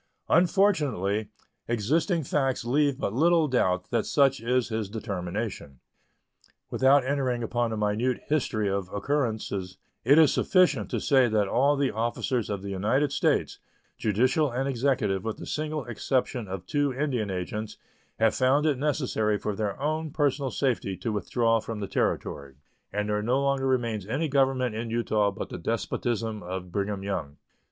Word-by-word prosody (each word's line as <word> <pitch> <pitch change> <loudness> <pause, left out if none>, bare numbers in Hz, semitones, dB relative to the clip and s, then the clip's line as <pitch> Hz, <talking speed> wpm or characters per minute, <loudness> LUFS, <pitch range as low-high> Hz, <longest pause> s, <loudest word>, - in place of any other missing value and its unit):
Unfortunately, 150 - +2 0.4
existing 155 - +1
facts 135 -3 0
leave 140 +2 +2
but 100 - -2
little 165 +4 +3
doubt 95 -9 0
that 115 -2 0
such 135 -2 +3
is 125 +1 +1
his 110 -3 -2
determination. 100 - -5 0.9
Without 135 0 +4
entering 130 -3 0
upon 120 0 -1
a 110 - -3
minute 105 +4 0
history 120 -8 0
of 95 -2 -2
occurrences, 105 -6 -2 0.3
it 140 +3 +5
is 155 -4 +6
sufficient 150 - +2
to - - -1
say 130 -3 +4
that 105 -3 +1
all 140 +7 +3
the 140 -2 +1
officers 120 +1 -1
of 100 -2 -3
the 100 - -5
United 120 +9 +1
States, - - 0 0.4
judicial 130 +8 +2
and 130 +3 -2
executive, 120 -7 0
with 110 -1 -3
the - - -8
single 155 -2 -3
exception 120 -1 -1
of 95 -1 -6
two 145 -1 0
Indian 130 -6 -1
agents, 95 +4 -4 0.4
have 110 -1 +3
found 135 +4 +2
it 145 -5 +1
necessary 130 -8 0
for 105 0 -3
their 105 +1 -3
own 155 +2 -1
personal 140 -2 0
safety 120 -9 -1
to 115 - -3
withdraw 115 +2 +1
from 110 0 -6
the 100 - -3
Territory, 70 -6 -2 0.4
and 105 +1 -2
there 105 0 0
no 125 +5 +1
longer 140 -1 +1
remains 115 -6 -1
any 140 +8 -1
government 135 -4 +1
in 115 +1 -4
Utah 110 -3 +1
but - - -6
the - - -6
despotism 115 -2 -2
of 90 0 -6
Brigham 100 +1 -2
Young. 75 -8 -4
120 Hz, 160 wpm, -27 LUFS, 105-140 Hz, 0.9 s, is